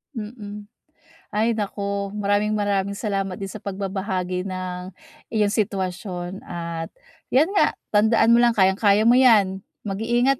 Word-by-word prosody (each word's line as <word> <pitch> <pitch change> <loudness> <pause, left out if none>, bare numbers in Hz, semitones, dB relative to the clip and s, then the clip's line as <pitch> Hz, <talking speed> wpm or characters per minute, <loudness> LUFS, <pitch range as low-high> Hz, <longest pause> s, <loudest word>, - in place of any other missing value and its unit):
Mm. 210 -2 -7 0.6
Ay 220 +3 +2
naku, 200 -1 -3
maraming-maraming 205 -1 0
salamat 195 -3 -2
din 195 -1 -5
sa - - -8
pagbabahagi 190 -2 -3
ng 185 0 -5 0.4
iyong 210 -2 +2
sitwasyon, 190 -3 -3
at 170 -1 -5 0.4
'yan 285 +5 +4
nga, - - +3 0.2
tandaan 220 +2 +4
mo - - +5
lang 240 -1 +4
kayang-kaya 200 +2 +4
mo 240 - +6
'yan, 210 -7 +5 0.2
mag-iingat 240 +6 +1
200 Hz, 120 wpm, -23 LUFS, 190-215 Hz, 0.6 s, mo